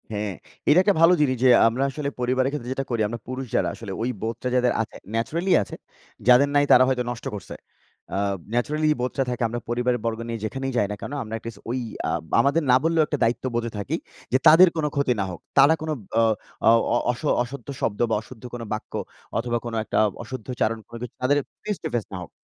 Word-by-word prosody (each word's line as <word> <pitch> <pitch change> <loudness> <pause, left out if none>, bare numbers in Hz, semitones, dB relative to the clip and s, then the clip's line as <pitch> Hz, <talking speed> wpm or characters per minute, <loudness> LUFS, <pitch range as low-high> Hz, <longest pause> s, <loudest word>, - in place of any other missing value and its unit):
হ্যাঁ। 105 -1 -2 0.4
এটা 150 +5 +7
একটা 205 +1 +3
ভালো 165 +2 +7
জিনিস 130 -3 +2
যে, 130 - +6 0.2
আমরা 120 +4 0
আসলে 140 +1 -3
পরিবারের 130 +1 +1
ক্ষেত্রে 125 -5 -5
যেটা 135 +1 -3
করি, 120 -3 0
আমরা 115 +2 -5
পুরুষ 130 +1 -4
যারা, - - +2
আসলে 110 -4 -8
ওই 120 - 0
বোধটা 115 +3 -3
যাদের 125 -1 +3
আছে, 115 - -6 0.2
নেচারাল্লি 170 +11 0
আছে, - - -9 0.5
যাদের 125 +3 +6
নাই 145 0 +5
তারা 125 - +8
হয়তো 130 -2 +1
নষ্ট 120 - -8
করছে। 100 - -8 0.6
আ - - 0 0.4
নেচারাল্লি 150 +6 +1
বোধটা 130 +2 0
থাকে 125 0 -2
আমরা 120 +1 -4
পরিবারের 120 +1 +1
বর্গ 115 -1 -1
নিয়ে 115 -2 -4
যেখানেই 135 +4 -3
যাই 105 - +2
না - - -3
কেন? - - -6
আমরা 110 0 -8
অ্যাট 115 - -7
লিস্ট 115 -3 -8
ওই, 125 +2 -1 0.3
আ - - 0 0.3
আমাদের 140 +4 +3
না - - +7
বললেও 165 0 +3
একটা 150 - -1
দায়িত্ববোধে 120 0 0
থাকি 100 - -2 0.4
যে, - - +6
তাদের 175 +4 +9
কোনো 155 -2 +1
ক্ষতি 140 -3 +2
না - - 0
হোক। 90 - -8 0.2
তারা 140 +3 +7
কোন 160 - -4 0.3
অ, - - +4 0.4
অ - - +9 0.2
অ - - +3 0.2
অস 120 - -8 0.2
অশুদ্ধ 125 0 -9
শব্দ 105 - -1
বা 110 - +2
অশুদ্ধ 115 0 -14
কোন 120 - -5
বাক্য, 110 - -6 0.4
অথবা 120 +1 0
কোনো 115 -1 -4
একটা - - -1 0.2
অশুদ্ধ 130 -4 -8
আচরণ, 115 -1 0
কোনো 115 - -9
কিছু 125 -2 -6
তাদের 135 +3 +3 0.3
ফেস 210 -3 -2
টু - - -1
ফেস 115 - -1
না - - -3
হোক - - -12
125 Hz, 220 wpm, -24 LUFS, 115-140 Hz, 0.6 s, তাদের